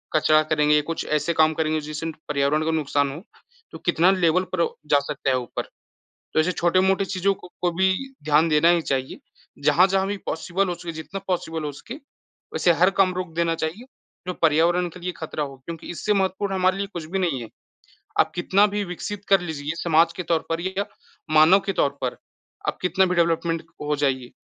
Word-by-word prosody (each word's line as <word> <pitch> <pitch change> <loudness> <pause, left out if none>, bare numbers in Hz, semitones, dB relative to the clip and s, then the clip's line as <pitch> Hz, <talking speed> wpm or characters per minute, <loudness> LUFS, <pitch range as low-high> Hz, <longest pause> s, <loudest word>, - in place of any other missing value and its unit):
कचरा 155 0 +5
करेंगे 150 -1 +4
या 150 - +4
कुछ 165 - -3
ऐसे 155 +3 0
काम 155 0 +4
करेंगे 155 0 0
जिससे 150 +2 -6 0.2
पर्यावरण 150 +2 +1
को 160 - 0
नुकसान 145 -3 0
हो, 155 +7 -9 0.5
तो - - -8
कितना 175 +4 +4
लेवल 185 -1 +2
पर 170 - +2 0.3
जा 145 - +6
सकता 135 - -2
है 130 - +3
ऊपर। 125 - -4 0.7
तो - - +3
ऐसे 175 +4 +2
छोटे-मोटे 190 +3 +2
चीज़ों 195 +1 0
को 180 0 -3
भी 190 +2 +2 0.3
ध्यान 155 +2 +4
देना 155 +2 +4
ही 175 -1 +4
चाहिए, 130 -3 -3 0.4
जहाँ-जहाँ 190 +6 +4
भी 205 - -2
पॉसिबल 180 +4 -1
हो 175 - -2
सके, 170 -1 -7
जितना 160 +5 -7
पॉसिबल 165 -3 -2
हो 145 - -3
सके 235 - -9 0.6
वैसे 175 - +3
हर 180 +3 +4
काम 185 -1 +4
रोक 180 -3 -4
देना 170 -1 +1
चाहिए, 165 +11 -4 0.4
जो 180 - -1
पर्यावरण 170 +3 +3
के 180 +2 -12
लिए 180 +1 -3
खतरा 155 -1 -4
हो 135 -1 -7
क्योंकि 165 -1 -7
इससे 210 +5 -1
महत्वपूर्ण 195 0 0
हमारे 185 +1 +2
लिए 200 0 -2
कुछ 170 -3 -5
भी 195 - 0
नहीं 155 -9 0
है। 115 - -8 0.7
आप - - +4
कितना 190 +3 +3
भी 205 0 -2
विकसित 200 +3 -6
कर 195 -2 +5
लीजिए 155 -4 -6
ये 160 - -2
समाज 165 0 +4
के 180 - -5
तौर 165 0 +1
पर 165 +1 -1
या 190 +3 -2 0.5
मानव 160 +6 +7
के 195 - -1
तौर 145 - +2
पर, 125 -1 -2 0.5
आप - - -1
कितना 185 +2 +2
भी 180 0 -1
डेवलपमेंट 165 -1 +1 0.2
हो 150 0 0
जाइए, 130 -3 -1
170 Hz, 200 wpm, -23 LUFS, 155-185 Hz, 0.7 s, मानव